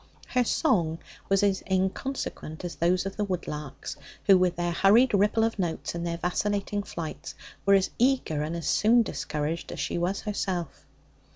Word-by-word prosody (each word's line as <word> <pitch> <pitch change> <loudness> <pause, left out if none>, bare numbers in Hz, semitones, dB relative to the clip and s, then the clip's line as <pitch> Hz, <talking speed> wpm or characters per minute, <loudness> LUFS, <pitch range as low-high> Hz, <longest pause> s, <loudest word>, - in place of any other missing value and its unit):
Her 250 -1 +2
song 180 - +1 0.3
was 195 0 +3
as 195 -2 +2
inconsequent 190 - -2
as 175 - -4
those 180 +2 +1
of 195 - -5
the 210 - 0
woodlarks, 150 -7 -5 0.3
who, 195 - +7
with 180 -1 +3
their 175 0 -1
hurried 215 +9 +5
ripple 205 +3 +3
of 225 -2 0
notes 170 -3 -2
and 170 0 -3
their 170 0 -2
vacillating 205 +3 -1
flights, 170 -5 -6 0.3
were 200 - +7
as 190 -1 +2
eager 245 - +2
and 155 +3 -2
as 170 -3 -5
soon 230 +2 +4
discouraged 155 -2 -3
as - - -6
she - - -1
was 180 +3 -1
herself. 190 -5 -3
185 Hz, 170 wpm, -27 LUFS, 170-205 Hz, 0.3 s, who